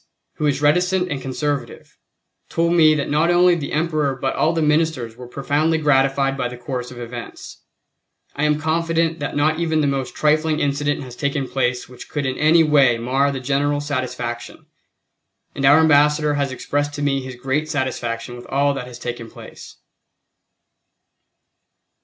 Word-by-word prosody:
who 150 - 0
is 145 0 -1
reticent 180 +4 +2
and 140 -2 -3
conservative, 140 +2 -4 0.5
told 170 +1 +1
me 155 -3 +5
that 145 - -2
not 155 +3 +2
only 175 0 +5
the 155 -5 -3
Emperor 155 -3 0
but 135 +1 -2
all 160 - +2
the 165 - -1
Ministers 150 -6 0
were 125 0 -10
profoundly 145 +5 0
gratified 135 -2 +2
by 130 -2 -2
the 125 0 -8
course 125 0 -5
of 125 - -11
events. 120 0 -9 0.7
I 150 - 0
am 150 0 +1
confident 165 +1 0
that 145 - -4
not 155 +2 +1
even 160 -2 0
the 150 - +2
most 135 -2 -2
trifling 155 +1 +1
incident 145 0 -1
has 125 -2 -10
taken 140 0 -2
place 125 -2 -1
which 125 -1 -12
could 145 -2 -3
in 130 0 -1
any 160 +2 +5
way 140 -6 +4
mar 135 +4 +1
the 135 - -4
general 145 +2 0
satisfaction, 130 -4 -4 0.9
and 135 - -2
our 145 +3 +7
Ambassador 150 -1 +4
has 140 -2 -1
expressed 145 +2 -2
to 145 - -4
me 135 -1 +1
his 130 -1 -8
great 135 +5 -2
satisfaction 120 -4 -3
with 120 - -11
all 140 +1 +1
that 130 -3 -6
has 125 -1 -10
taken 120 -2 -6
place. - - -12
145 Hz, 170 wpm, -21 LUFS, 130-155 Hz, 0.9 s, our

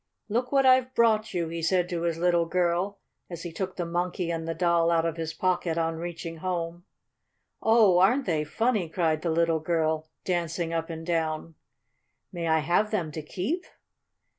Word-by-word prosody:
"Look 245 +4 -1
what 275 -1 +4
I've 255 0 +4
brought 220 -2 +3
you," 170 -2 -1
he 165 0 -4
said 180 +2 +2
to 170 -3 -2
his 170 -1 -1
little 170 -1 +2
girl, 180 +3 0 0.3
as 170 -2 -7
he 175 - -5
took 185 +3 -4
the 175 - -2
Monkey 175 0 -2
and 165 -1 -3
the 165 - -2
Doll 170 0 +2
out 165 -1 +2
of 165 -1 -1
his 165 -1 -3
pocket 175 0 0
on 165 -1 0
reaching 165 0 -6
home. 175 0 -3 0.8
"Oh, 220 -5 +5
aren't 245 +9 +4
they 155 -3 0
funny!" 215 +2 0
cried 160 -2 0
the 170 - -1
little 165 0 +2
girl, 160 -1 0 0.2
dancing 170 -2 -1
up 165 0 -2
and 165 0 -6
down. 165 -1 -1 0.8
"May 170 -1 -3
I 160 -1 +3
have 175 +7 +2
them 175 -8 -2
to 155 - -5
keep?" 205 - -3
170 Hz, 185 wpm, -27 LUFS, 165-185 Hz, 0.8 s, Oh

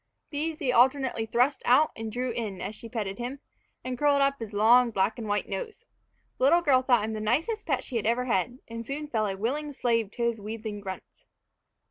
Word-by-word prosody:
These 310 +2 -2
he 270 -5 0
alternately 255 -2 +3
thrust 250 +5 +2
out 275 +6 +4
and 225 -1 -5
drew 250 +2 -2
in, 220 -5 -4
as 205 - -4
she 230 - -10
petted 210 -4 -4
him, 250 +3 -4 0.4
and 255 -1 -4
curled 290 -1 +4
up 275 0 +2
his 225 -2 -6
long, 235 +4 +5
black 215 +2 0
and 220 - -5
white 205 0 -1
nose. 445 -3 -6 0.5
The 255 - +3
little 340 +5 +5
girl 275 -6 +4
thought 245 -5 +3
him 220 - -4
the 215 - -3
nicest 310 - -1
pet 265 -5 0
she 245 - -3
had 215 - -1
ever 240 +2 +1
had, 245 +1 0
and 230 0 -6
soon 290 +5 -5
fell 220 -5 0
a 195 -1 -3
willing 290 +8 -2
slave 230 -5 0
to 240 - -3
his 235 -2 0
wheedling 215 0 -5
grunts. 190 -2 -9
240 Hz, 215 wpm, -27 LUFS, 220-275 Hz, 0.5 s, long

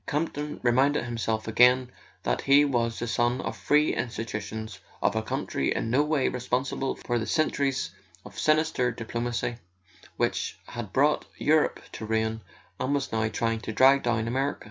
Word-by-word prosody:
Campton 150 0 -2
reminded 130 +4 +3
himself 115 -2 -2
again 125 +2 +4 0.3
that - - 0
he 140 +1 +5
was 120 -4 0
the 120 - -3
son 120 +1 +1
of - - -4
free 150 +1 +2
institutions, 110 -3 -4 0.2
of 100 - +1
a 110 - +1
country 70 -10 -2
in 115 - -2
no 130 +4 +4
way 150 -2 +1
responsible 130 +2 -1
for 120 -1 -2
the 110 - -4
centuries 140 -4 0 0.3
of - - -9
sinister 155 -5 +2
diplo¬ 115 0 -5
macy 120 0 -2 0.6
which - - -1
had 120 -5 -6
brought 145 +6 +2
Europe 155 0 +2
to - - -8
ruin, 110 0 -1 0.4
and 140 +2 0
was 140 -1 -2
now 110 0 +1
trying 115 +1 -1
to 110 - -5
drag 135 +5 +5
down 115 -2 0
America. 135 +4 -1
120 Hz, 165 wpm, -27 LUFS, 115-140 Hz, 0.6 s, he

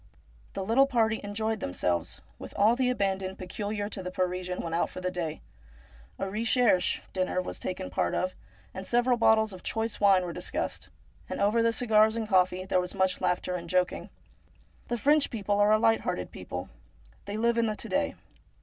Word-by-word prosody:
The 195 - -3
little 255 +6 +4
party 225 -4 +1
enjoyed 220 +2 -2
themselves 90 -2 -2 0.2
with - - -9
all 215 +4 +5
the 255 0 +1
abandon 195 -5 -1
peculiar 205 +2 -4
to 200 - -6
the 180 - -4
Parisian 180 0 -2
when 165 - -4
out 170 - +1
for - - -8
the 185 0 -2
day. 165 -4 -4 0.8
A 195 - -2
recherche, 220 -2 +2
dinner 185 -1 0
was 185 - -4
partaken 180 - -4 0.2
of, 185 0 -1 0.4
and 190 0 -6
several 245 +1 +3
bottles 220 -2 +3
of 185 - -10
choice 225 0 -2
wine 195 -3 +5
were 170 - -5
discussed, - - -4 0.4
and - - -4
over 210 +3 +3
the 230 0 +3
cigars 220 -2 +3
and 225 -1 -2
coffee 185 -2 +2
there 185 -1 +2
was 180 - -6
much 190 -1 +1
laughter 180 0 0
and 170 -1 -5
joking. 180 0 0 0.8
The 240 - -1
French 290 +5 +3
people 205 -2 -1
are 205 +1 +5
a 215 - +6
light 225 0 +3
hearted 90 - -3
people. 90 0 -6 0.6
They 205 +1 -4
live 235 +1 +2
in 230 - +2
the 215 - -1
to - - -5
day. - - 0
200 Hz, 185 wpm, -28 LUFS, 185-225 Hz, 0.8 s, a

